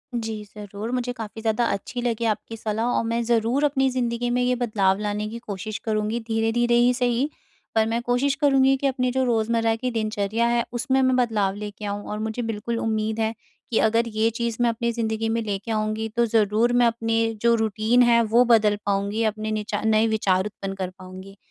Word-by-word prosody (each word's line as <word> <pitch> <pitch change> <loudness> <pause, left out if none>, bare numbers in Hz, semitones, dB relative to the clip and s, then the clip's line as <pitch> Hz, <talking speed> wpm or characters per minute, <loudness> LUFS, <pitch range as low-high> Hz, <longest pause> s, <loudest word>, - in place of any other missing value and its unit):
जी। 220 -2 -3
ज़रूर 205 +2 -6
मुझे 250 -1 -1
काफ़ी 225 -2 -7
ज़्यादा 225 +2 +1
अच्छी 220 +5 -4
लगी 235 -1 -1
आपकी 225 +1 -2
सलाह 220 +1 -2
और - - +1
मैं 230 +1 0
ज़रूर 235 +4 +1
अपनी 270 -2 +2
ज़िंदगी 245 -1 -1
में - - +1
ये 250 0 +2
बदलाव 210 -6 +1
लाने 210 0 -2
की 230 - -6
कोशिश 215 -2 -5
करूँगी। 215 +1 -1
धीरे-धीरे 225 +2 +1
ही 240 +1 +4
सही 245 +2 0 0.5
पर 220 0 +4
मैं 230 +1 -1
कोशिश 245 +3 +1
करूँगी 270 -1 +4
कि 275 - 0
अपनी 255 -2 0
जो 260 +1 +1
रोज़मर्रा 230 -1 +1
की 250 +2 -3
दिनचर्या 215 0 -1
है 235 0 +2
उसमें 265 +2 +1
मैं 260 -1 +3
बदलाव 215 -6 +1
लेके 210 0 -7
आऊँ 205 0 -3
और 210 - -3
मुझे 220 +2 -3
बिल्कुल 225 0 -3
उम्मीद 220 0 -1
है 220 0 0 0.4
कि 225 - +2
अगर 230 +2 +2
ये 220 0 +1
चीज़ 235 -1 -1
मैं 240 - +4
अपनी 235 +1 -1
ज़िंदगी 225 -1 -2
में 230 +1 0
लेके 205 0 -4
आऊँगी 215 0 -1
तो 235 0 +3
ज़रूर 220 +1 +2
मैं - - +5
अपने 225 0 0 0.2
जो 235 0 +4
रूटीन 220 +2 +2
है 235 -1 +5
वो 240 +1 +7
बदल 220 -3 +4
पाऊँगी 200 +2 0
अपने 215 0 -1
निचा 210 -1 -2
नए 220 0 +3
विचार 195 -4 +1
उत्पन्न 200 -2 -5
कर 190 -2 -3
पाऊँगी। 185 +2 -11
225 Hz, 200 wpm, -24 LUFS, 215-240 Hz, 0.5 s, वो